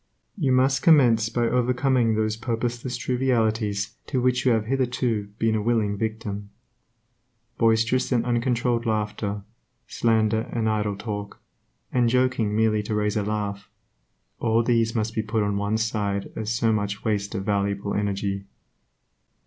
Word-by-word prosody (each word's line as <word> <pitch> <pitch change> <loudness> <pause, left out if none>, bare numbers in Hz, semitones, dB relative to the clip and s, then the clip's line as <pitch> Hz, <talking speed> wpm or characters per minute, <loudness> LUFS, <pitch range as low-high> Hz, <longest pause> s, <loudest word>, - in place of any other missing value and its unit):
You 150 - 0
must 135 +1 +3
commence 120 -9 +5
by 120 - -1
overcoming 125 -1 +2
those 110 0 0
purposeless 120 +2 -3
trivialities 110 -5 0
to 130 - 0
which 125 +1 +1
you - - +5
have 110 -2 0
hitherto 125 -4 -1
been 115 -1 +1
a 110 - 0
willing 110 -2 +1
victim. 105 -1 -4 1.1
Boisterous 115 +3 +2
and 120 -2 +2
uncontrolled 120 0 0
laughter, 105 -1 -2 0.4
slander 110 -1 +1
and 115 -2 -1
idle 105 -2 0
talk, 105 -1 -6 0.5
and 120 -2 +2
joking 125 -4 +1
merely 110 -1 +2
to 105 +1 -3
raise 105 0 0
a 105 - +1
laugh, 105 -1 -3 0.7
all 115 0 +2
these 115 -1 +2
things 115 - -8
must 110 0 -1
be 110 - 0
put 110 0 -1
on 100 0 -1
one 100 +2 0
side 105 -3 -2
as 110 -1 -3
so 115 0 +1
much 100 -1 -2
waste 100 -2 -1
of 95 - -3
valuable 100 0 -1
energy. 100 -1 -2
110 Hz, 150 wpm, -24 LUFS, 105-120 Hz, 1.1 s, commence